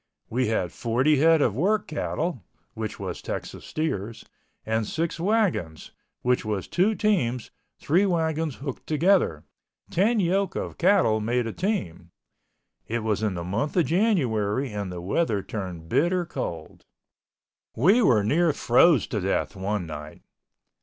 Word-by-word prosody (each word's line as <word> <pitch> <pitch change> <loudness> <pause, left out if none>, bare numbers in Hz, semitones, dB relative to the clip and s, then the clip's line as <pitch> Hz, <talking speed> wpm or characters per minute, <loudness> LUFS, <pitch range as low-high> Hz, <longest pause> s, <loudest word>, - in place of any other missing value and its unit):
We 125 +2 +1
had 95 -6 -1
forty 130 +6 +1
head 160 +1 +5
of 110 - +1
work 200 - +1
cattle 155 - -3 0.3
(which 110 -2 -5
was - - -5
Texas - - -6
steers) 115 -9 -3 0.4
and 110 -1 -1
six 165 +1 -2
wagons 180 - 0 0.3
(which 125 0 +2
was 105 -4 -3
two 200 +5 +2
teams, 130 - 0 0.3
three 180 +7 +2
wagons 160 -4 0
hooked 135 -1 -7
together—ten 180 - 0
yoke 195 +2 +1
of - - -5
cattle 175 - +4
made 120 +2 0
a 115 - -4
team). 90 - -3 0.8
It 115 0 -2
was 110 -2 0
in 105 -4 -1
the 85 - -4
month 110 - -2
of 175 - +4
January 130 - +1
and 100 -3 -4
the 90 -1 -6
weather 100 - 0
turned 90 -6 -6
bitter 175 - +1
cold. 80 - -6 0.9
We 190 - +4
were 115 - +4
near 160 +9 +2
froze 140 +4 +4
to 105 - -3
death 95 +2 -1
one 95 0 -2
night. 75 -1 -9
125 Hz, 140 wpm, -25 LUFS, 105-170 Hz, 0.9 s, head